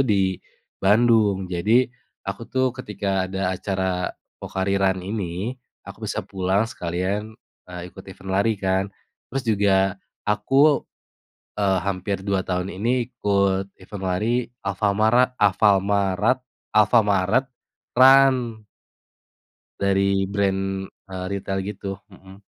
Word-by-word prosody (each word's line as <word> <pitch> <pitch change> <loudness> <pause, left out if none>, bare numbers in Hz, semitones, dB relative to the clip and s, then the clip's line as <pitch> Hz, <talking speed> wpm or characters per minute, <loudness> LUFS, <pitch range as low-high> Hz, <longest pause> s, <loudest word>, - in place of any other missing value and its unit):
di 95 -5 +1 0.4
Bandung. 105 -1 +4
Jadi 100 +8 +2 0.4
aku 100 +4 -6
tuh 130 -1 +1
ketika 100 -6 -2
ada 95 -1 -1
acara 95 -1 -2 0.3
Pocari 95 +1 -1
Run 95 -1 +1
ini, 100 +2 -3 0.3
aku - - -8
bisa - - -3
pulang 95 +2 0
sekalian, 100 +2 -3 0.3
eee, 90 0 -8
ikut 95 - -12
event 95 0 -9
lari 100 +3 +2
kan. 95 0 0 0.4
Terus 135 0 -3
juga 100 -3 +3 0.3
aku, 135 +8 +3 0.7
eee, 95 -2 +1
hampir 95 0 -2
2 100 -2 +1
tahun 90 +1 -3
ini 120 +5 0
ikut 100 -1 0
event 95 +1 -9
lari, 105 +7 +1 0.2
alfamara 110 +6 +2
alfalmarat 100 +3 +2 0.3
Alfamart 105 +1 +3 0.5
Run. 130 -4 +5 1.2
Dari 100 0 +2
brand, 95 -1 -1 0.2
eee, 95 -1 -5
ritel 95 0 -2
gitu, 100 0 -6 0.2
mhm. 95 +1 -15
100 Hz, 110 wpm, -23 LUFS, 95-110 Hz, 1.2 s, Run